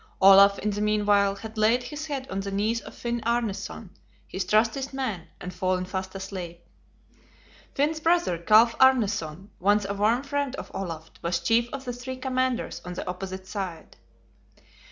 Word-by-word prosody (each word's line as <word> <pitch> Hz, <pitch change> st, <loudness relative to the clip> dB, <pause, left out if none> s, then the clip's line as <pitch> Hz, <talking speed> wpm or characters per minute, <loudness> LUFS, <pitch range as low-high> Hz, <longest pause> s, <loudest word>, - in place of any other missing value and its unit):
Olaf, 195 Hz, +1 st, +8 dB
in 210 Hz, -, -1 dB
the 205 Hz, +1 st, -3 dB
mean 210 Hz, 0 st, +1 dB
while, 200 Hz, -1 st, +3 dB
had 220 Hz, +2 st, -8 dB
laid 230 Hz, +4 st, +3 dB
his 295 Hz, +5 st, -6 dB
head 275 Hz, -3 st, -4 dB
on 195 Hz, -, -2 dB
the 195 Hz, 0 st, -4 dB
knees 215 Hz, +4 st, 0 dB
of -, -, -12 dB
Finn 235 Hz, 0 st, -3 dB
Arneson, 230 Hz, -3 st, -2 dB, 0.4 s
his 190 Hz, -, -3 dB
trustiest 235 Hz, +6 st, +1 dB
man, 215 Hz, -11 st, -3 dB
and 180 Hz, -, -7 dB
fallen 185 Hz, 0 st, -1 dB
fast 190 Hz, +1 st, -5 dB
asleep. 180 Hz, -3 st, -7 dB, 1.1 s
Finn's 305 Hz, +3 st, +1 dB
brother, 330 Hz, -, +2 dB
Kalf 220 Hz, +6 st, +5 dB
Arneson, 205 Hz, -9 st, +2 dB
once 205 Hz, +2 st, +3 dB
a 200 Hz, -, -2 dB
warm 220 Hz, +6 st, +2 dB
friend 285 Hz, -1 st, -2 dB
of -, -, -8 dB
Olaf, 165 Hz, -4 st, -5 dB
was 170 Hz, 0 st, 0 dB
chief 230 Hz, +7 st, +2 dB
of 275 Hz, 0 st, -6 dB
the 245 Hz, -, -3 dB
three 250 Hz, +2 st, -6 dB
commanders 255 Hz, -1 st, -1 dB
on 180 Hz, 0 st, -7 dB
the -, -, -5 dB
opposite 185 Hz, +1 st, -5 dB
side. 185 Hz, -4 st, -6 dB
210 Hz, 170 wpm, -26 LUFS, 190-245 Hz, 1.1 s, Olaf